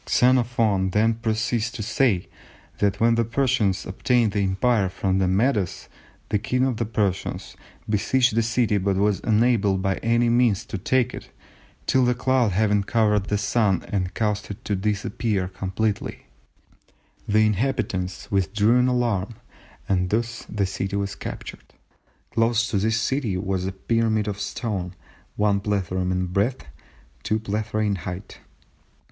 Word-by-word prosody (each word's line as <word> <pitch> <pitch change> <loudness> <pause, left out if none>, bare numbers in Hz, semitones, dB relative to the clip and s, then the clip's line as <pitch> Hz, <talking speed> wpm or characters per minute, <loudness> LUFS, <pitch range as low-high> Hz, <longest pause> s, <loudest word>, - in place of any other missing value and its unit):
Xenophon 115 -6 +3
then 110 +4 +2
proceeds 115 0 -1
to 110 - -5
say 105 -4 +1 0.5
that 100 0 +1
"when 115 +1 +4
the 115 0 +2
Persians 115 -5 0
obtained 120 -5 +1
the 100 - 0
Empire 95 +2 +1
from 95 0 -1
the 95 - +2
Medes, 100 0 0 0.4
the 105 - +1
King 125 +5 0
of 130 -4 -1
the 115 -1 -2
Persians 105 -4 -2 0.3
besieged 125 +4 +2
the 115 - +3
city 115 -2 +1
but 100 0 0
was 100 0 +1
unable 110 -3 +3
by 95 0 -1
any 120 +1 +2
means 120 -4 +2
to 100 - -5
take 130 +5 +1
it - - -9 0.6
till 130 -2 +3
a 125 - +1
cloud 125 -3 +2
having 105 +1 +2
covered 105 -1 +1
the 105 - 0
Sun 100 -2 +1
and 95 -2 -2
caused 105 -2 -1
it 105 +4 -8
to 105 - 0
disappear 105 0 -1
completely, 95 +3 -3 1.0
the 110 +1 +4
inhabitants 100 -4 -1
withdrew 105 +5 +2
in 125 - +3
alarm, 120 -4 0 0.5
and 90 -2 +1
thus 115 +2 -2
the 105 -2 0
city 95 +1 -3
was 100 0 -2
captured. - - -8 0.6
Close 115 0 +2
to 100 - +1
this 110 +3 +1
city 115 -5 -1
was 95 -1 -2
a - - -2
pyramid 110 +2 0
of 100 -1 -3
stone, 95 -6 -3 0.4
one 105 -1 +2
plethrum 95 -3 -1
in 90 0 0
breadth, 100 - -1 0.6
two 110 +1 0
plethra 110 0 -2
in 100 -2 0
height.... 90 +2 -7
105 Hz, 150 wpm, -24 LUFS, 95-115 Hz, 1.0 s, when